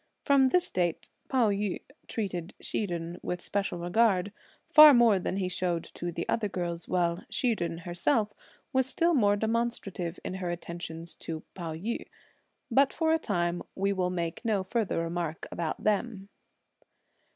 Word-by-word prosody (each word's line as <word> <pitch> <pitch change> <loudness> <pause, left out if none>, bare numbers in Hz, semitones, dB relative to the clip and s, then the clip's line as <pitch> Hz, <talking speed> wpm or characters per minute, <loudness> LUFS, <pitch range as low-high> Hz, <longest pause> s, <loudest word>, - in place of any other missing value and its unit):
From 280 -2 +5
this 360 +7 +2
date, 175 -2 -1 0.2
Pao 245 -6 +3
yü 200 -1 -1 0.3
treated 185 -5 -4
Hsi 210 - -2
Jen 170 -1 -5
with 180 - -3
special 195 -1 -2
regard, 190 +2 +2 0.4
far 305 -2 +10
more 230 -5 +5
than 185 - -2
he 190 -2 0
showed 180 -2 -1
to 175 0 -4
the 170 0 -4
other 210 -3 0
girls, 175 -3 -3
while 175 -1 0
Hsi 245 -3 +1
Jen 170 -3 -3
herself 195 - 0 0.4
was 260 0 +2
still 335 +5 +2
more 205 -8 +4
demonstrative 220 -6 -2
in - - -3
her 180 - -2
attentions 170 -1 -6
to 160 -1 -5
Pao 165 -4 -5
yü. 215 +9 -4 0.6
But 275 0 +5
for 320 -1 +1
a 325 - +2
time 175 - -1
we 195 +1 +1
will 185 -2 0
make 170 +2 -3
no 210 -5 +1
further 195 -4 -1
remark 165 -1 -3
about 165 -2 -3
them. 210 -1 0
185 Hz, 160 wpm, -29 LUFS, 175-225 Hz, 0.6 s, far